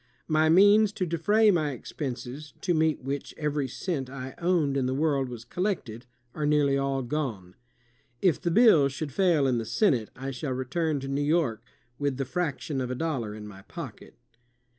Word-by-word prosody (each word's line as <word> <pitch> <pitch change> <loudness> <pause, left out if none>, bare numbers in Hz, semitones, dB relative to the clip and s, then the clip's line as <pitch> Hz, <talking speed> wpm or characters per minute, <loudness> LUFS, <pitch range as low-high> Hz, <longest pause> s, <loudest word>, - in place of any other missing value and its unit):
My 155 0 +3
means 205 +4 +6
to 185 - -1
defray 205 +6 +3
my 155 -6 0
expenses, 135 +2 -6
to 180 - +1
meet 155 -3 +1
which 140 +1 -4
every 150 -2 -1
cent 135 0 -3
I 130 -1 -7
owned 170 -5 +1
in 135 -2 +1
the 130 - -1
world 140 -3 +1
was 120 -2 -8
collected, 125 - -3 0.3
are 150 -1 -2
nearly 145 -2 +3
all 135 -1 0
gone. 120 -10 -3 0.7
If 180 -6 +2
the 175 - 0
bill 170 - +6
should 140 +2 -5
fail 170 -3 +3
in 125 -3 +2
the - - -3
Senate, 125 - +1
I 135 +1 -5
shall 130 +1 -3
return 140 +4 -1
to 135 - -5
New 140 +1 -1
York 145 -7 +1 0.4
with 140 -2 -1
the 135 - -2
fraction 145 -2 -2
of 125 - -3
a 130 - -2
dollar 125 -8 -2
in 105 -1 -8
my 95 -2 -11
pocket." - - -9
140 Hz, 185 wpm, -27 LUFS, 130-165 Hz, 0.7 s, means